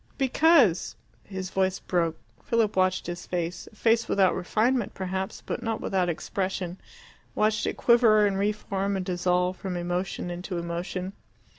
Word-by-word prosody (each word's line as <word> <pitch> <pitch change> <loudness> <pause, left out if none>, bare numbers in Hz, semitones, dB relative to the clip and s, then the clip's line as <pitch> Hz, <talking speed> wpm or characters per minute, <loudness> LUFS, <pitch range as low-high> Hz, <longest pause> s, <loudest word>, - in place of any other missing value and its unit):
"Because 270 - +4
" - - -35
His 190 0 -4
voice 190 0 +1
broke. 165 -4 -1 0.3
Philip 225 -3 +1
watched 185 0 +2
his 175 0 -6
face, 175 0 -3
a - - -20
face 230 +1 +2
without 190 -2 +4
refinement 220 +6 0
perhaps, 190 +2 -4
but - - -3
not 225 -1 -2
without 185 -2 0
expression, 185 +1 -3 0.6
watched 215 0 +1
it - - -2
quiver 230 -3 +5
and 195 -1 0
re 205 +1 +2
form 200 -1 -2
and 185 - -3
dissolve 180 0 0
from 185 -2 -4
emotion 175 +1 -3
into 180 +1 -5
emotion. 175 +2 -4
190 Hz, 155 wpm, -27 LUFS, 180-215 Hz, 0.6 s, quiver